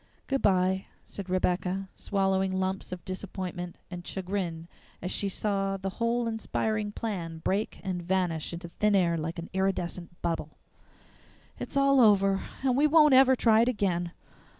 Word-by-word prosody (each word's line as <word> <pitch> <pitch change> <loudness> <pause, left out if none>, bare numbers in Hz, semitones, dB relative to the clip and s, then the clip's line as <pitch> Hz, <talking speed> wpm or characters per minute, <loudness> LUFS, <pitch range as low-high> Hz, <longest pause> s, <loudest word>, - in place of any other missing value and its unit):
"Goodby," 190 -7 +2 0.2
said 195 -2 -8
Rebecca, 185 +1 0
swallowing 190 -1 0
lumps 190 0 -2
of 180 -2 -7
disappointment 185 -2 -5
and 175 -1 -5
chagrin 180 -4 -3 0.3
as 180 - -4
she 200 - 0
saw 195 -1 -1
the 195 0 -4
whole 235 +1 +1
inspiring 220 -1 -1
plan 180 -7 -4
break 205 +3 -1
and 185 -2 -2
vanish 175 -3 -1
into 170 0 -7
thin 210 +4 +1
air 175 -3 +3
like 165 +1 -3
an 170 0 -7
iridescent 180 -2 -2
bubble. 165 -3 -2 1.0
"It's - - -4
all 275 0 +5
over 195 -3 +4 0.2
and 260 -2 +2
we 290 +3 +4
won't 300 -2 +6
ever 260 0 +7
try 225 -2 +4
it 235 - +3
again. 180 -7 0
190 Hz, 150 wpm, -28 LUFS, 180-210 Hz, 1.0 s, ever